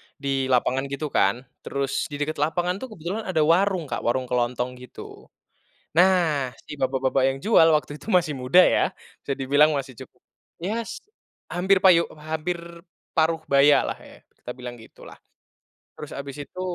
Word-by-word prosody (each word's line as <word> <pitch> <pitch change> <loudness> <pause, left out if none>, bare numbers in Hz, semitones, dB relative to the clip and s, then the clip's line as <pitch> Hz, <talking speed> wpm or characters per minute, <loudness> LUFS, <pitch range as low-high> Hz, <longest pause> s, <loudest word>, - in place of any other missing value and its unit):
di 135 -1 -2
lapangan 130 +1 +1
gitu 140 +1 -5
kan. 115 +7 +1 0.2
Terus, 140 -1 -2
di 145 - -8
dekat 145 +1 -3
lapangan 175 +5 0
tuh, 260 - -6
kebetulan 180 +7 -5
ada 160 -5 +2
warung, 180 +3 +2
Kak. 145 - -4
Warung 130 +2 0
kelontong 125 +1 -1
gitu. 125 - -12 0.7
Nah, 170 -6 +3 0.2
si 150 - -8
bapak-bapak 130 0 +1
yang 135 - -3
jual, 190 -7 +6
waktu 150 0 -8
itu - - -9
masih 175 -6 +2
muda, 130 +4 0
ya. - - +2 0.3
Bisa 140 - -3
dibilang 145 +3 +4
masih 135 -1 -5
cuk - - -10 0.5
ya, 205 +7 -3
s 225 - -7 0.5
hampir 190 +2 +3
payu 175 -3 +6
hampir 155 +3 -3 0.6
paruh 160 0 +2
bayalah 140 +1 +4
ya, - - -15 0.2
kita 125 - -7
bilang 125 -1 -8
gitulah. - - -14 0.8
Terus - - -9
habis 140 0 -7
itu, 185 - -10
145 Hz, 160 wpm, -24 LUFS, 130-170 Hz, 0.8 s, jual